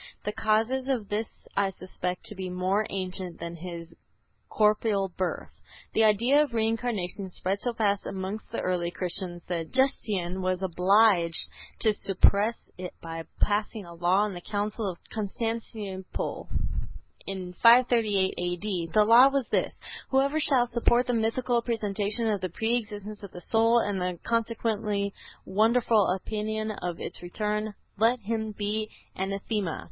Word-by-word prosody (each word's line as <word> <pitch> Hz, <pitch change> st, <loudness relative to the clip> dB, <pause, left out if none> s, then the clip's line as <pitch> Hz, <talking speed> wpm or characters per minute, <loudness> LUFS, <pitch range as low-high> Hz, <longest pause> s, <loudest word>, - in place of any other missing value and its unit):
The 210 Hz, -, -1 dB
causes 225 Hz, +5 st, +1 dB
of 245 Hz, -7 st, -1 dB
this 215 Hz, +2 st, -1 dB, 0.3 s
I 200 Hz, -1 st, +2 dB
suspect 180 Hz, -1 st, -5 dB
to -, -, -4 dB
be 185 Hz, -1 st, -4 dB
more 185 Hz, +4 st, 0 dB
ancient 185 Hz, -2 st, -4 dB
than 170 Hz, 0 st, -5 dB
this 170 Hz, 0 st, -7 dB, 0.6 s
corporeal 210 Hz, -2 st, +2 dB
birth." 180 Hz, 0 st, -3 dB, 0.4 s
The 225 Hz, -, +4 dB
idea 235 Hz, +7 st, +5 dB
of 280 Hz, -6 st, -1 dB
Reincarnation 220 Hz, -4 st, -1 dB
spread 190 Hz, +2 st, -2 dB
so 245 Hz, -, -1 dB
fast 205 Hz, -3 st, +1 dB
amongst 195 Hz, +2 st, -5 dB
the 230 Hz, -, -2 dB
early 180 Hz, -2 st, 0 dB
Christians 175 Hz, -1 st, -4 dB
that 165 Hz, -2 st, -3 dB
Justinian 200 Hz, -9 st, +1 dB
was 185 Hz, 0 st, -1 dB
obliged 185 Hz, -1 st, +4 dB, 0.4 s
to 220 Hz, -2 st, +4 dB
suppress 205 Hz, +3 st, +2 dB
it 180 Hz, -1 st, -6 dB
by 165 Hz, 0 st, -6 dB, 0.2 s
passing 210 Hz, 0 st, 0 dB
a 170 Hz, -, -10 dB
law 180 Hz, +4 st, +3 dB
in 210 Hz, -, -4 dB
the 175 Hz, -, -7 dB
Council 210 Hz, +1 st, -2 dB
of 175 Hz, -, -6 dB, 0.2 s
Constantinople 215 Hz, -2 st, -4 dB, 0.8 s
in 185 Hz, -2 st, -5 dB
538 230 Hz, -5 st, +5 dB
A.D. 175 Hz, 0 st, -2 dB
The 210 Hz, -1 st, +6 dB
law 235 Hz, +4 st, +8 dB
was 275 Hz, -3 st, -1 dB
this: -, -, 0 dB, 0.3 s
"Whoever 275 Hz, +3 st, +2 dB
shall 270 Hz, -5 st, +4 dB
support 240 Hz, +1 st, +2 dB
the 250 Hz, -, 0 dB
mythical 235 Hz, +2 st, +1 dB
presentation 215 Hz, -1 st, 0 dB
of 205 Hz, -3 st, 0 dB
the 185 Hz, -, -2 dB
pre 225 Hz, +7 st, 0 dB
existence 210 Hz, -2 st, -5 dB
of 200 Hz, -3 st, -9 dB
the 180 Hz, -, -8 dB
soul, 230 Hz, +1 st, +4 dB
and 205 Hz, -5 st, 0 dB
the 180 Hz, -1 st, -2 dB
consequently 220 Hz, -3 st, -1 dB, 0.3 s
wonderful 220 Hz, +1 st, +3 dB
opinion 215 Hz, +3 st, -2 dB
of 180 Hz, -5 st, -4 dB
its -, -, -6 dB
return, 210 Hz, +3 st, -2 dB, 0.2 s
let 235 Hz, +3 st, +4 dB
him 220 Hz, +1 st, -2 dB
be 210 Hz, +1 st, -2 dB, 0.3 s
Anathema." 195 Hz, -1 st, -2 dB
210 Hz, 145 wpm, -28 LUFS, 185-225 Hz, 0.8 s, law